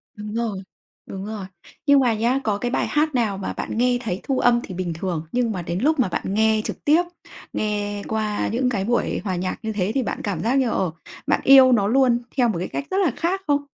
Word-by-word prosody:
Đúng 210 0 -7
rồi, 225 -4 -2 0.5
đúng 195 +1 -7
rồi. 210 -3 -5 0.4
Nhưng 285 -1 +6
mà 245 -3 +3
nhé, 240 +5 +1
có 205 -2 0
cái 245 +3 -3
bài - - 0
hát 300 -1 +1
nào 215 -5 +1
mà 195 - -4
bạn - - -5
nghe 245 0 +3
thấy 190 -5 -3
thu 270 -2 -1
âm 240 0 +4
thì 185 - -7
bình 175 -2 -3
thường, 165 -1 -3
nhưng 245 -2 +1
mà 180 -3 -3
đến 170 +2 -3
lúc 300 +3 +2
mà 240 - +3
bạn 185 +2 -3
nghe 220 0 +3
trực - - -6
tiếp, 315 +4 +5 0.5
nghe 205 -1 -2
qua 215 -1 -1
những 250 +2 +1
cái 200 -5 -1
buổi 240 +1 0
hòa 190 -3 -2
nhạc 185 +1 -3
như 220 0 -2
thế 200 0 -1
thì 265 - +2
bạn - - -4
cảm 190 -6 -2
giác 240 +4 +1
như, 250 -3 +1
ờ, 185 -6 0 0.4
bạn - - +2
yêu 265 -1 +8
nó 205 -4 +3
luôn 245 0 +3 0.2
theo 245 -2 +4
một 200 - -1
cái 180 - -3
cách 280 - -4
rất 380 - 0
là 360 -9 +3
khác 370 +3 -1
không? 285 0 +2
220 Hz, 250 wpm, -22 LUFS, 200-255 Hz, 0.5 s, yêu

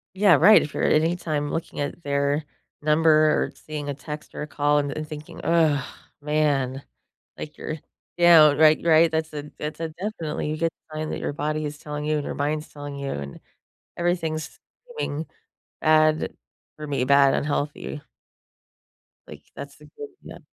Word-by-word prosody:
Yeah, 195 -4 +6
right, 205 +9 +7
if 150 - -5
you're - - -2
at - - +3
any 170 +2 +1
time 150 -4 -3
looking 165 - -4
at 145 +4 -4
their 140 +1 0 0.4
number 155 +2 +3
or 155 0 +3
seeing 150 -2 -6
a - - -1
text 150 +2 -8
or - - -6
a 150 - -4
call 145 0 +1
and 145 -1 -2
and 155 0 -5
thinking, 150 0 -9
"Ugh, 160 -4 +2 0.4
man," 145 -3 0 0.6
like 150 - -8
you're 155 0 -5 0.4
down, 155 -4 +7
right, 155 0 +6
right, 165 0 +5
that's 160 0 -2
a 150 0 -7
that's 150 +2 -5
a 165 - -2
definitely 160 -4 -4
a - - -3
good 165 +1 +1 0.2
sign 155 0 -4
that - - -4
your - - -2
body 155 +1 -2
is 150 0 -5
telling 150 -1 -6
you 155 0 0
and 145 - -2
your - - -4
mind's 150 +2 -2
telling 145 -1 -8
you 140 -1 -4
and 70 -1 -6 0.6
everything's 165 -3 -2 0.4
seeming 150 +3 -3 0.6
bad 155 0 +3 0.4
for 150 -1 -7
me 140 -3 -1
bad, 140 +1 +5
unhealthy. 145 0 -3 1.3
Like, - - -12
that's - - -9
the - - -16
good 435 -1 -7
yep. - - -11
150 Hz, 175 wpm, -24 LUFS, 145-160 Hz, 1.3 s, right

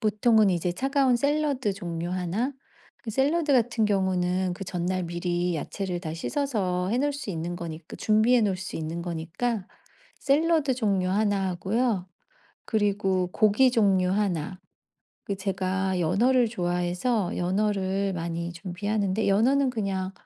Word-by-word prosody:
보통은 215 -1 +3
이제 175 0 0
차가운 270 +4 +2
샐러드 280 -4 0
종류 175 -3 -5
1 185 +9 -1 0.5
그 225 - -4
샐러드 290 +6 +1
같은 240 -3 +2
경우는 185 -2 +1
그 195 - -8
전날 185 0 -2
미리 175 0 -1
야채를 180 +3 -4
다 160 -3 -5
씻어서 185 - -1
해 240 - +1
놓을 290 +2 +1
수 275 -7 -5
있는 170 +1 -4
거니 165 -2 -6
그 - - -8
준비해 220 +3 +3
놓을 200 -3 +1
수 190 +1 -6
있는 160 +2 -4
거니까 180 +6 -3 0.5
샐러드 300 -1 +2
종류 200 -6 0
1 200 -1 +1
하고요. 195 +2 -1 0.6
그리고 200 -4 +1
고기 220 +4 +4
종류 195 -6 +3
1. 185 -4 -1 0.7
그 200 - -3
제가 190 -1 -1
연어를 235 +9 +3
좋아해서 180 +1 -1
연어를 195 +1 0
많이 170 0 -3
준비하는데 200 +4 -2
연어는 255 +7 +3
그냥 195 -5 -2
195 Hz, 280 characters per minute, -26 LUFS, 180-230 Hz, 0.7 s, 고기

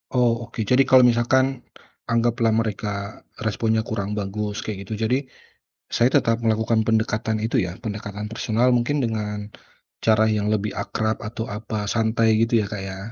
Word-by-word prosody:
Oh, 120 -2 +2
oke. 110 - -4
Jadi 125 +5 +3
kalau 130 -1 +7
misalkan, 125 +2 +3 0.5
anggaplah 115 -1 +2
mereka 105 -1 -3 0.2
responnya 110 0 0
kurang 105 -2 -3
bagus 105 +2 -3
kayak 105 -3 -5
gitu 110 - -4
jadi, 130 +5 0 0.7
saya 120 - +4
tetap 115 0 +2
melakukan 110 0 +1
pendekatan 110 0 0
itu 120 +2 +1
ya? 90 -2 -3
Pendekatan 105 -1 -6
personal 115 +2 +1
mungkin 125 +3 +1
dengan 105 -2 -3 0.5
cara 110 -1 +4
yang 105 -1 0
lebih 105 -1 0
akrab 110 0 -2
atau 110 0 -5
apa, 105 0 -4
santai 110 -1 +2
gitu 115 +1 +3
ya 105 - -1
Kak 105 - -3
ya? 95 0 -7
110 Hz, 155 wpm, -23 LUFS, 105-115 Hz, 0.7 s, kalau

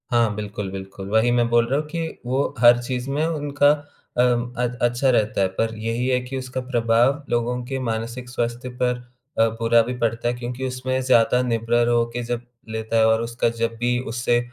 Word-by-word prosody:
हाँ, 115 -3 +3
बिल्कुल, 105 -1 -5
बिल्कुल। 95 0 -7
वही 110 +3 +3
मैं 120 -1 +3
बोल 120 0 +3
रहा 135 +4 +1
हूँ 155 - -5
कि 165 +1 -3 0.2
वो 130 +3 0
हर 120 0 +6
चीज़ 125 +1 -4
में 145 +3 0
उनका 145 -3 +2 0.5
अम, 120 -1 +3 0.2
अ, 125 - 0 0.2
अच्छा 120 +2 +2
रहता 110 -5 +2
है। 95 - +3
पर 115 0 +1
यही 115 +3 -1
है 125 -1 +2
कि 125 +2 -6
उसका 130 0 -4
प्रभाव 125 +2 +2
लोगों 120 +1 0
के 135 +1 -3
मानसिक 120 +1 -4
स्वास्थ्य 120 +1 -3
पर 125 0 +2 0.4
अ, 115 - +6
बुरा 115 0 +4
भी 120 +2 -3
पड़ता 115 0 -1
है 120 - +1
क्योंकि 125 +2 -4
उसमें 130 0 -2
ज़्यादा 125 -1 +4
निर्भर 120 -1 +1
होके 120 0 +1
जब 120 0 -3 0.3
लेता 110 +1 -2
है 110 - +5
और 110 0 +3
उसका 115 0 0
जब 115 0 -2
भी 120 +1 +1 0.2
उससे 120 0 +2
120 Hz, 200 wpm, -23 LUFS, 115-125 Hz, 0.5 s, हर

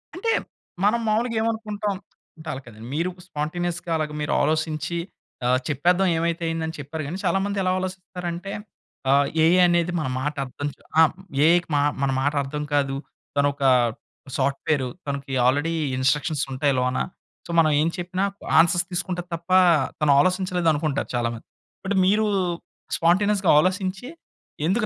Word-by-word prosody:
అంటే, 450 +6 0 0.5
మనం 225 +3 +3
మావులుగా 230 +2 +1
ఏమనుకుంటాం. 215 -2 -2 0.4
అంటే 155 - -12
అలా 135 - -5
కాదండి. 115 0 -11
మీరు 170 +4 0 0.2
స్పాంటేనియస్‌గా 170 +2 -3
అలాగా 155 -1 -3
మీరు 150 - -1
ఆలోచించి 155 +1 0 0.5
ఆహ్, 125 +1 +3
చెప్పేదాం 175 +6 +2
ఏవైతే 170 +1 -1
అయింది 165 0 -2
అని 160 - -5
చెప్పారు. 150 +2 -5
కానీ, 170 +5 -4
చాలా 195 - +2
మంది 205 0 -2
ఎలా 185 - +2
ఆలోచిస్తారు 185 -1 -6
అంటే 180 +4 -6 0.6
ఆహ్, 140 +1 +4 0.2
ఏఐ 170 +3 +5
అనేది 175 0 +2
మన 155 - -2
మాట 150 +3 -1
అర్థం 145 +3 -5
చ్ - - -38 0.2
ఆ! - - +9 0.4
ఏఐకి 175 +1 +4
మా 145 - +3 0.2
మన 135 - +2
మాట 145 +2 +1
అర్థం 150 +2 -4
కాదు. 140 -2 +1 0.4
తన 140 - +4
ఒక 140 - -6 0.7
సాఫ్ట్‌వెర్ 140 0 0 0.2
తనకి 140 -1 -4
ఆల్రెడీ 145 +6 +2 0.2
ఇన్‌స్ట్రక్‌షన్స్ 145 +3 +1
ఉంటాయి 140 +2 +1
లోన. 125 0 0 0.5
సో, - - -15
మనం 155 -2 +4
ఏం 160 - +2
చెప్పినా 180 +2 -2 0.4
ఆన్‌సర్స్ 175 +1 +4
తీసుకుంటది 180 0 -3
తప్ప 170 +2 -12 0.5
తను 150 -1 +3
ఆలసించలేదనుకుంటారు 170 -4 +1
చాలా 120 -1 +1
మంది. 115 - -13 0.4
బట్ 200 +1 0
మీరు 210 +3 +3 0.7
స్పాంటేనియస్‌గా 195 +3 +3
ఆలోసించి 185 +5 -1 0.6
ఎందుకు 210 +5 +1
165 Hz, 150 wpm, -24 LUFS, 145-185 Hz, 0.7 s, ఆ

